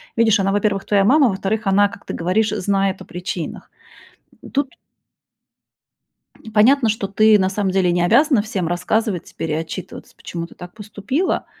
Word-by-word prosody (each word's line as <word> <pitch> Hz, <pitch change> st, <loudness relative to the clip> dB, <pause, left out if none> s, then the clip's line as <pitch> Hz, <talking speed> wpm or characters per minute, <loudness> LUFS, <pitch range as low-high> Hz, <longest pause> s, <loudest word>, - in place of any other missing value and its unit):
видишь, 225 Hz, -2 st, +3 dB
она, 195 Hz, 0 st, +1 dB
во-первых, 200 Hz, -1 st, 0 dB
твоя 200 Hz, -1 st, +2 dB
мама, 270 Hz, +3 st, +5 dB
во-вторых, 200 Hz, +2 st, -2 dB
она, 200 Hz, +1 st, +4 dB
как 200 Hz, -, -13 dB
ты -, -, -6 dB
говоришь, 190 Hz, +6 st, 0 dB
знает 195 Hz, -2 st, -1 dB
о -, -, -9 dB
причинах. 180 Hz, -2 st, -6 dB, 0.8 s
Тут 275 Hz, -1 st, -1 dB, 1.8 s
понятно, 230 Hz, +3 st, +4 dB
что 210 Hz, -2 st, -2 dB
ты 215 Hz, +2 st, +4 dB
на 190 Hz, 0 st, +1 dB
самом 195 Hz, -1 st, -1 dB
деле 185 Hz, -2 st, +2 dB
не 175 Hz, 0 st, +1 dB
обязана 275 Hz, -, +4 dB
всем 200 Hz, -5 st, -3 dB
рассказывать 180 Hz, +2 st, -1 dB
теперь 165 Hz, -, -6 dB
и -, -, 0 dB
отчитываться, 165 Hz, +3 st, -6 dB
почему 170 Hz, -1 st, -7 dB
ты -, -, -18 dB
так 180 Hz, 0 st, -11 dB
поступила. 215 Hz, -, -3 dB
200 Hz, 160 wpm, -20 LUFS, 185-220 Hz, 1.8 s, мама